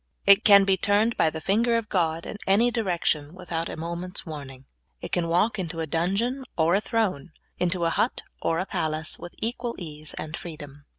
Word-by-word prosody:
It 200 +1 +7
can 200 -2 +8
be 195 -1 +3
turned 205 +5 +2
by 160 - +3
the 160 - -6
finger 230 +7 +2
of 230 -2 -3
God 165 -4 0
in - - -6
anj^ 230 +5 +4
direction 175 -7 0
without 170 -2 -4
a - - -6
moment's 170 +3 -4
warning. 140 -5 -8 0.3
It - - -7
can 175 -1 0
walk 180 +6 +2
into 170 -2 -4
a 160 - 0
dun 170 +5 0
geon 250 +5 -1 0.2
or 165 +1 +3
a 195 - +3
throne, 205 - -1 0.3
into 180 -1 0
a 165 - +2
hut 235 - 0 0.2
or 165 - +1
a 185 - -1
palace, 160 -4 -2
with 175 - -9
equal 235 +1 -3
ease 155 -3 -5
and 155 0 -5
freedom. 145 -4 -9
175 Hz, 200 wpm, -26 LUFS, 160-205 Hz, 0.3 s, can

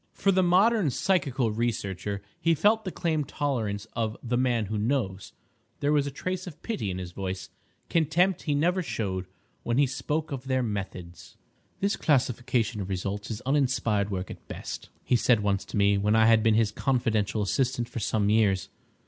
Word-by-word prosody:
For 195 - +2
the 190 0 +3
modern 190 +1 +4
psychical 135 - +1
researcher 100 -3 -2 0.2
he 165 -1 +3
felt 215 +7 +3
the 185 - -3
calm 160 -3 0
tolerance 115 -9 -2
of 110 -2 -2
the 120 0 -1
"man 120 -3 +1
who 105 +1 -3
knows." 105 -5 -1 0.5
There 145 +1 +1
was 145 -1 +2
a - - -1
trace 185 +6 -4
of 160 -3 -10
pity 130 - -2
in 90 - -3
his 90 -2 -6
voice—contempt 155 - -1
he 145 - 0
never 175 +6 +2
showed—when 105 - -4
he 145 - +5
spoke 150 +4 -2
of 135 -2 -5
their 130 -1 +1
methods. 95 -6 -6 0.4
"This 200 +1 +2
classification 120 -5 +1
of 95 - -5
results 100 +2 -3
is 110 0 -4
uninspired 125 -7 +1
work 95 -2 -4
at - - -11
best," - - -7
he 125 - +2
said 120 -1 +3
once 100 -1 0
to - - -5
me, 100 0 +4
when 105 +2 +2
I 110 0 +5
had 115 0 +6
been 110 -1 +3
his 110 -2 +3
confidential 110 -5 0
assistant 120 +3 0
for 120 - -5
some 105 -1 +1
years. 105 -4 +2
120 Hz, 175 wpm, -27 LUFS, 100-145 Hz, 0.5 s, had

